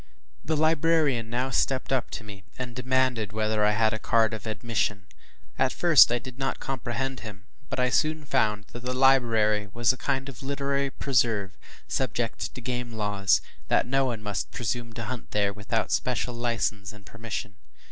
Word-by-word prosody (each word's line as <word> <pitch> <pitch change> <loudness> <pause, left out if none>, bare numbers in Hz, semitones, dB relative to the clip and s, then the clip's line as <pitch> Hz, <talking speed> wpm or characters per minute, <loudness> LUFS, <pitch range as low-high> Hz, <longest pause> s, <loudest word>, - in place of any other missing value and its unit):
The 160 0 0
librarian 155 -6 +2
now 125 +3 -1
stepped 135 +1 +1
up 130 -3 0
to - - -6
me, 100 -3 -10
and 125 -2 -5
demanded 125 -4 +1
whether 110 0 +1
I 105 0 +4
had 110 0 +2
a 110 - -3
card 115 0 +2
of 110 0 -6
admission. 110 -2 -1 0.5
At 130 - +3
first 170 -8 +7
I 120 - +2
did 125 +2 -9
not 135 - -1
comprehend 135 0 -3
him, 100 -3 -9 0.2
but - - -3
I 125 0 +2
soon 155 +4 +1
found 105 -5 +1
that 120 - -7
the 125 +1 -3
library 115 -6 +3
was 120 +2 +3
a - - -10
kind 135 0 -1
of 135 -2 -9
literary 140 0 -1
“preserve,” 115 -8 0 0.3
subject 120 -3 -2
to 125 - -7
game 125 -1 -3
laws, 105 -3 +2
and - - -24
that - - +3
no 135 +2 +2
one 115 -4 -3
must 105 -1 -3
presume 120 0 -3
to 115 +1 -5
hunt 120 0 -6
there 100 -1 +1
without 110 +2 -2
special 125 0 0
license 115 -4 -1
and 105 -2 -15
permission. 115 -3 -6
120 Hz, 180 wpm, -27 LUFS, 110-130 Hz, 0.5 s, first